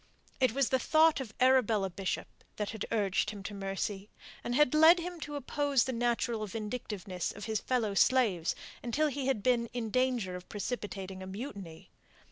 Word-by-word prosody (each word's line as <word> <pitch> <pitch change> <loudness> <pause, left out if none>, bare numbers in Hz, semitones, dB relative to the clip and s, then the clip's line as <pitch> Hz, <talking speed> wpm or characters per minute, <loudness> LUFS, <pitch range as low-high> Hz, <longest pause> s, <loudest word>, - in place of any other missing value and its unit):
It 255 -4 +3
was 270 -2 +2
the 260 - +2
thought 315 +3 +4
of 240 -5 -7
Arabella 230 -7 +3
Bishop 190 +1 -3 0.3
that 210 -1 -3
had 220 - -5
urged 205 -2 +1
him 205 -2 -7
to 210 - -6
mercy, 195 +1 -4 0.3
and 240 - -2
had 295 -1 +4
led 320 +3 +7
him 350 0 -5
to 295 -1 -6
oppose 285 -1 +1
the 260 - -3
natural 235 -2 0
vindictiveness 205 -4 -4
of 205 - -8
his 220 -2 -1
fellow 235 -5 0
slaves 195 -7 +3 0.3
until 295 +6 +1
he 275 -1 -3
had 260 -7 0
been 240 -2 +2
in 230 -3 -3
danger 250 -7 +1
of 180 0 -9
precipitating 200 -3 -5
a 185 - -7
mutiny. 195 - -8
230 Hz, 175 wpm, -31 LUFS, 200-260 Hz, 0.3 s, led